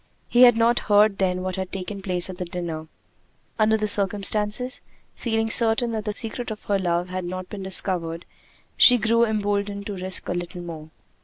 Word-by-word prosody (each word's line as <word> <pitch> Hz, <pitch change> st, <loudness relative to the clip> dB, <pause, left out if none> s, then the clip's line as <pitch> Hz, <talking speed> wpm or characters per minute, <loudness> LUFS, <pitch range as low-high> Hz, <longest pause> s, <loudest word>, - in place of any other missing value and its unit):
He 245 Hz, -, +2 dB
had 240 Hz, -2 st, +7 dB
not 235 Hz, +1 st, +3 dB
heard 205 Hz, -1 st, +4 dB
then 185 Hz, -1 st, 0 dB
what 185 Hz, 0 st, -4 dB
had 190 Hz, -1 st, -5 dB
taken 195 Hz, +1 st, -6 dB
place 180 Hz, -2 st, -1 dB
at 185 Hz, 0 st, -9 dB
the 180 Hz, -, -3 dB
dinner. 170 Hz, -3 st, -6 dB, 0.7 s
Under 220 Hz, 0 st, +3 dB
the 215 Hz, 0 st, -2 dB
circumstances, 210 Hz, +4 st, +1 dB, 0.3 s
feeling 225 Hz, -1 st, -2 dB
certain 230 Hz, 0 st, +3 dB
that 220 Hz, -2 st, -4 dB
the 210 Hz, -, -1 dB
secret 225 Hz, +2 st, -4 dB
of 215 Hz, -1 st, -7 dB
her 200 Hz, -1 st, 0 dB
love 175 Hz, -1 st, -1 dB
had 185 Hz, 0 st, -4 dB
not 185 Hz, +1 st, -6 dB
been 205 Hz, -, -7 dB
discovered, 180 Hz, -3 st, -1 dB, 0.5 s
she 245 Hz, -, +7 dB
grew 230 Hz, +1 st, +2 dB
emboldened 205 Hz, -2 st, -2 dB
to 205 Hz, -, -5 dB
risk 185 Hz, 0 st, +1 dB
a -, -, -2 dB
little 175 Hz, 0 st, -6 dB
more. 160 Hz, -2 st, -9 dB
200 Hz, 185 wpm, -23 LUFS, 180-220 Hz, 0.7 s, had